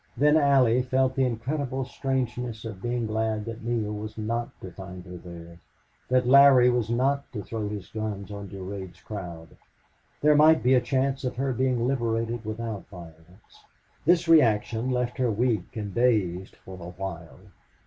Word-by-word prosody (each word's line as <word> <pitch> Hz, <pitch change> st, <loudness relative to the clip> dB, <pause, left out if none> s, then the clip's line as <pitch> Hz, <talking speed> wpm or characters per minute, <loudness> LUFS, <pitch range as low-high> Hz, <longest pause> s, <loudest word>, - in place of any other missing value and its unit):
Then 150 Hz, +2 st, +4 dB
Allie 135 Hz, -5 st, +4 dB
felt 130 Hz, +1 st, +1 dB
the 135 Hz, -, +2 dB
incredible 130 Hz, +2 st, -3 dB
strangeness 125 Hz, -3 st, -3 dB
of 100 Hz, -4 st, -7 dB
being 120 Hz, 0 st, -1 dB
glad 110 Hz, -1 st, -1 dB
that 115 Hz, -1 st, -7 dB
Neale 115 Hz, -3 st, -1 dB
was 105 Hz, +1 st, -7 dB
not 115 Hz, +2 st, -2 dB
to 95 Hz, -, -8 dB
find 95 Hz, -1 st, -9 dB
her 90 Hz, -1 st, -9 dB
there 85 Hz, -1 st, -11 dB, 0.5 s
that 125 Hz, 0 st, +3 dB
Larry 135 Hz, -2 st, +7 dB
was 120 Hz, -3 st, 0 dB
not 135 Hz, +4 st, 0 dB
to 105 Hz, -4 st, -5 dB
throw 110 Hz, -1 st, -4 dB
his 105 Hz, -4 st, -6 dB
guns 105 Hz, -2 st, -5 dB
on 100 Hz, -1 st, -7 dB
Durade's 95 Hz, -1 st, -7 dB
crowd. 85 Hz, -6 st, -8 dB, 0.7 s
There 150 Hz, +1 st, +5 dB
might 155 Hz, +2 st, +5 dB
be 125 Hz, +2 st, +4 dB
a 125 Hz, -, +5 dB
chance 135 Hz, +2 st, 0 dB
of 125 Hz, -, -2 dB
her 135 Hz, +1 st, -1 dB
being 125 Hz, -1 st, 0 dB
liberated 115 Hz, -3 st, -1 dB
without 110 Hz, -1 st, -5 dB
violence. 85 Hz, +1 st, -15 dB, 0.4 s
This 170 Hz, +1 st, +3 dB
reaction 120 Hz, -6 st, +3 dB
left 125 Hz, -1 st, -1 dB
her 125 Hz, -2 st, +2 dB
weak 110 Hz, -4 st, -1 dB
and 100 Hz, -3 st, -4 dB
dazed 100 Hz, -7 st, +1 dB
for 95 Hz, -1 st, -12 dB
a 85 Hz, -, -7 dB
while. 85 Hz, -7 st, -6 dB
115 Hz, 165 wpm, -26 LUFS, 100-130 Hz, 0.7 s, Larry